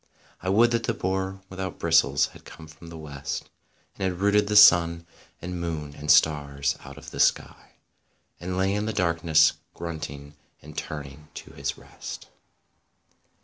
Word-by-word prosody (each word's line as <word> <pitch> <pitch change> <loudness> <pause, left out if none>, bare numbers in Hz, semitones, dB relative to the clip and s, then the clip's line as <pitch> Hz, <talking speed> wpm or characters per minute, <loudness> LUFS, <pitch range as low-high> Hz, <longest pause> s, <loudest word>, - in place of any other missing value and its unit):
I 95 - -3
would 115 +5 +4
that 115 -1 0
the 115 - -1
boar 95 0 -2
without 95 -1 -6
bristles 80 -4 +3
had - - -15
come 80 - -12
from 80 +2 -14
the 85 0 -9
West 70 -2 -6 0.5
And - - -3
had 90 - -8
rooted 100 +1 +3
the 105 - -1
sun 85 -4 +7 0.4
and 90 0 -5
moon 75 -4 -4
and 75 +1 -8
stars 70 -3 +3
out - - -11
of - - -11
the - - -8
sky - - 0 0.7
And 90 +1 -4
lay 95 +1 +1
in 105 +1 -1
the 110 - -2
darkness, 85 -4 +3 0.2
grunting, 75 -4 -7 0.3
and 75 +1 -13
turning 75 0 -7
to - - -9
his - - -4
rest. - - -10
85 Hz, 160 wpm, -26 LUFS, 75-95 Hz, 0.7 s, sun